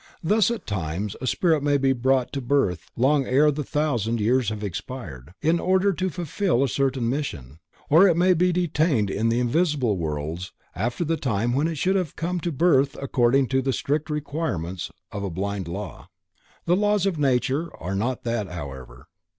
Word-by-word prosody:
Thus, 210 +4 +3
at 235 -1 -4
times 95 0 -3
a 130 - -3
spirit 160 +1 +2
may 145 0 +2
be 135 -1 +2
brought 130 0 +1
to 140 - -2
birth 120 - 0
long 135 +2 +2
ere 145 +4 +4
the 150 +1 -3
thousand 120 -7 -1
years 120 +2 +2
have 105 -1 -5
expired, 90 - -7
in 165 +2 +3
order 190 +2 +2
to 185 +2 -1
fulfill 175 - 0
a - - +2
certain 130 0 0
mission, 80 - -4 0.3
or 165 +7 +6
it 170 -3 +3
may 185 +1 +5
be 180 +1 +2
detained 155 - +1
in 110 +4 0
the 115 +1 +1
invisible 130 - +1
worlds 80 +2 -4 0.2
after 120 - -2
the 165 +1 0
time 120 -3 0
when 145 +5 +1
it 165 - -3
should 190 +7 +2
have 180 -6 -3
come 175 +2 -2
to 170 +1 -2
birth 140 -2 +2
according 135 0 +2
to 130 +1 +2
the 135 0 0
strict 150 +5 -1
requirements 140 - -3 0.2
of 100 - -5
a 100 - -2
blind 95 +1 -3
law. 95 +3 -7 0.6
The 175 - +3
laws 205 0 +2
of 185 -6 0
nature 135 +3 +1
are 90 +3 -5
not 115 +6 -2
that 115 -4 -2
however. 65 -6 -8
130 Hz, 185 wpm, -24 LUFS, 105-160 Hz, 0.6 s, or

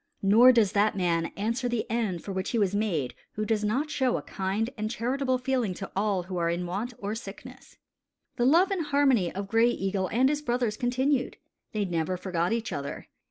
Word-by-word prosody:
Nor 225 +6 +7
does 225 -6 +3
that 205 0 +2
man 170 -2 +1
answer 230 +5 -1
the 240 -2 -1
end 215 -7 -1
for 200 - -6
which 190 0 -2
he 235 - -1
was 200 -3 +2
made 180 - -1 0.2
who 215 - -2
does 215 -1 0
not 260 +9 0
show 260 -2 +1
a - - -6
kind 200 +5 -2
and 215 0 -3
charitable 255 +3 0
feeling 250 -6 -1
to 195 - -7
all 195 -2 0
who 180 +1 -5
are 170 -1 +1
in 175 +1 -2
want 210 +7 -4
or 205 +1 -4
sickness. 235 +4 -10 0.6
The 240 - +1
love 340 +9 +5
and 345 -6 -1
harmony 270 -11 +3
of 195 +1 -5
Gray 225 +3 +4
Eagle 195 -4 -1
and 250 +7 +3
his 295 0 -1
brothers 240 -5 0
continued. 255 +3 0 0.3
They 210 -2 -1
never 175 0 -1
forgot 175 -1 -1
each 230 0 -2
other. 140 -1 -6
215 Hz, 205 wpm, -27 LUFS, 190-250 Hz, 0.6 s, Nor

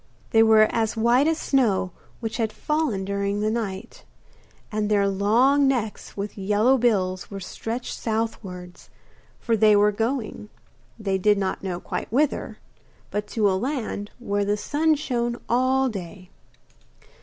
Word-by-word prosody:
They 225 - +5
were 220 -1 +6
as 225 0 -1
white 240 +6 +4
as 325 -1 +1
snow 220 - +1 0.3
which 225 -2 -3
had 225 -2 0
fallen 300 -12 -1
during 200 +1 -1
the 215 +1 +1
night, 210 -4 -5 0.7
and 210 -1 -1
their 200 -1 +3
long 235 +9 +3
necks 235 -7 -2
with 200 0 -5
yellow 210 +6 +3
bills 185 -6 0
were 200 - -6
stretched 225 +6 -5
southwards, 195 -5 -4 0.5
for 230 - +1
they 215 -1 +5
were 205 +1 +4
going 225 -1 -3 0.5
they 195 -3 -1
did 210 +2 +3
not 190 -1 -1 0.2
quite - - -4
know 240 - 0
whither 295 0 0 0.5
but 210 0 -2
to 215 -3 +1
a 195 - +2
land 220 -2 -3
where 205 -4 -1
the 205 +1 0
sun 310 +7 +1
shone 240 -5 -2
all 260 +2 +2
day. 185 -4 -7
215 Hz, 145 wpm, -24 LUFS, 200-245 Hz, 0.7 s, were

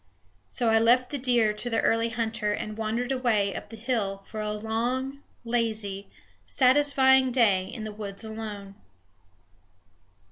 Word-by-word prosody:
So 240 -3 0
I 225 0 +4
left 245 +2 +3
the 285 - -3
deer 240 -4 +2
to 210 +3 -4
the 225 - +1
early 230 0 +2
hunter 225 -2 -1
and 215 +1 -5
wandered 225 +4 -2
away 225 -6 +1
up - - -7
the 225 - -10
hill 215 -4 -2
for 215 - -6
a 210 0 -2
long, 240 +6 -2 0.2
lazy, 220 -4 -2 0.4
satisfying 265 -1 +4
day 205 -7 +3
in 220 +2 -7
the 215 -1 -6
woods 205 -1 -7
alone. 215 -3 -7
225 Hz, 145 wpm, -27 LUFS, 210-250 Hz, 0.4 s, I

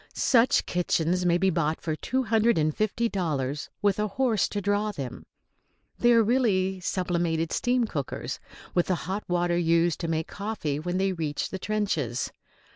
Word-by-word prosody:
Such 245 -2 +3
kitchens 180 0 0
may 175 0 +4
be 190 +1 +2
bought 160 -1 0
for 160 -2 -2
two 260 +10 -1
hundred 225 -1 +3
and 155 -1 +1
fifty 215 +2 0
dollars, 150 - -2
with 205 0 +2
a 210 - +1
horse 225 0 +1
to 205 - -2
draw 205 +1 0
them. 135 -10 -7 0.7
They 240 - +5
are 230 -1 +6
really 200 -6 +1
sublimated 170 -3 -1
steam 245 0 +1
cookers, 145 -10 -4 0.3
with 175 - +2
the 185 - +2
hot 195 +4 -3
water 175 0 +1
used 170 -1 +2
to 165 - -3
make 160 -1 -1
coffee 200 -9 -3
when 175 +3 -2
they 190 0 +1
reach 155 -4 -3
the 190 - -4
trenches. 180 - -1
185 Hz, 170 wpm, -27 LUFS, 165-210 Hz, 0.7 s, are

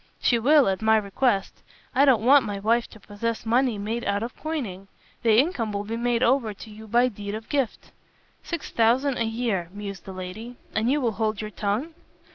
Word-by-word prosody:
"She 240 - +2
will, 285 +4 +5
at 190 +1 0
my 220 0 +4
request. 200 0 0 0.3
I 275 +1 +5
don't 240 -5 +4
want 275 +1 +7
my 205 -2 -4
wife 230 +4 +1
to 220 - -14
possess 220 +3 -4
money 240 0 +2
made 220 +4 -3
out 200 +1 0
of 240 - -6
coining. 230 - -5 0.3
The 225 -2 +4
income 255 - +1
will 200 0 -3
be 220 +2 -4
made 240 +1 0
over 235 -4 +2
to 220 - -11
you 220 +1 -11
by 240 +3 +3
deed 205 -3 -5
of 220 0 -8
gift." 275 -6 -2 0.5
"Six 335 -3 -5
thousand 245 +4 +2
a 230 - +1
year," 225 -6 -2
mused 200 -2 -7
the 195 - -7
lady, 185 +7 -7 0.2
"and 220 +2 +1
you 290 +2 +2
will 235 -3 +1
hold 215 -1 -1
your 215 -1 -5
tongue?" 215 +11 -2
225 Hz, 205 wpm, -25 LUFS, 205-245 Hz, 0.5 s, want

